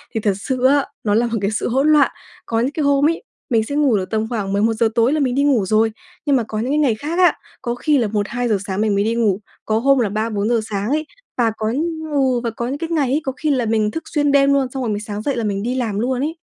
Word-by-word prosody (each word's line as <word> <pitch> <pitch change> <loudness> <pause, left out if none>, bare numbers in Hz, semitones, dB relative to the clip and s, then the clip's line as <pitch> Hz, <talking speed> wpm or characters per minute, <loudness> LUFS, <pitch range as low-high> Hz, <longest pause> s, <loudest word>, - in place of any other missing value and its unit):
thì - - +1
thật 205 -2 +1
sự 260 +2 -2
á, 280 +1 +4 0.2
nó 205 - +1
là 235 - +3
một 230 -1 -2
cái 200 +1 0
sự 215 - -1
hỗn 270 +5 +2
loạn. 295 -2 +5 0.3
Có 225 0 -1
những 255 +4 0
cái 305 +1 -2
hôm 285 +2 +3
ấy, 335 +7 -3 0.3
mình 225 -4 +2
sẽ 285 +6 -5
ngủ 285 -7 +3
được 185 -1 -3
tầm 220 0 0
khoảng 205 -5 -2
11:00 220 +2 +2
tối 235 +4 +3
là 310 - +1
mình 255 -3 0
đi 280 - +2
ngủ 255 -9 +3
rồi, 220 +3 +2 0.3
nhưng 285 -2 +3
mà 245 - +2
có 215 -1 -4
những 245 +4 -1
cái 295 - +2
ngày 275 -8 +2
khác 310 +9 -3
á, 360 -1 +6 0.3
có 240 0 -2
khi 295 +4 +1
là 235 -4 +1
1:00-2:00 215 +2 -1
sáng 195 0 -2
mình 210 -2 +1
mới 200 - +2
đi 225 +2 0
ngủ, 210 -5 +1 0.3
có 220 0 +1
hôm 275 +2 +3
là 225 -5 +1
3:00-4:00 215 +2 0
sáng 205 +1 -2
ấy, 310 +3 0 0.3
và 230 -2 +2
có 215 - -2 0.5
ừ, 265 -3 +2
và 235 - 0
có 235 +1 -4
những 275 - -3
cái 325 +2 -4
ngày 300 -6 +1
ấy, 295 +3 +1
có 265 - -2
khi 310 - -1
là 255 -5 +1
mình 215 -1 +1
thức 325 - -5
xuyên 290 -2 0
đêm 280 0 +4
luôn 275 -2 +2
xong 265 -1 -4
rồi 235 - -1
mình 205 0 -2
sáng 210 -1 -5
dậy 275 +4 -1
là 235 - -2
mình 200 -2 -2
đi 245 +3 -1
làm 225 -6 -1
luôn 250 +2 -1
ấy. 310 +3 -2
240 Hz, 290 wpm, -19 LUFS, 215-280 Hz, 0.5 s, á